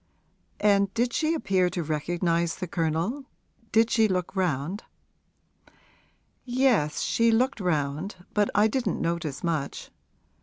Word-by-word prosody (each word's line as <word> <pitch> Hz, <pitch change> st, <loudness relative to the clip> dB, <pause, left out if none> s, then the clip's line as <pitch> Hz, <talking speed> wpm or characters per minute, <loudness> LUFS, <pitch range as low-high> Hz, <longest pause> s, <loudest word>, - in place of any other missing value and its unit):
'And 200 Hz, -1 st, +3 dB
did 240 Hz, +1 st, +1 dB
she 315 Hz, +1 st, +1 dB
appear 190 Hz, -, +1 dB
to 175 Hz, -1 st, -3 dB
recognise 170 Hz, +2 st, 0 dB
the 185 Hz, -, -4 dB
Colonel 170 Hz, -, -2 dB, 0.5 s
did 225 Hz, +1 st, +3 dB
she 220 Hz, -1 st, +4 dB
look 185 Hz, -1 st, -2 dB
round?' 180 Hz, -, -1 dB, 1.6 s
'Yes; 245 Hz, -, +1 dB
she 230 Hz, 0 st, +2 dB
looked 250 Hz, +3 st, +2 dB
round, 155 Hz, +1 st, -1 dB, 0.2 s
but 205 Hz, -1 st, +2 dB
I 210 Hz, +2 st, +5 dB
didn't 245 Hz, +3 st, -1 dB
notice 165 Hz, -4 st, -2 dB
much. 160 Hz, -5 st, -3 dB
185 Hz, 120 wpm, -26 LUFS, 165-225 Hz, 1.6 s, I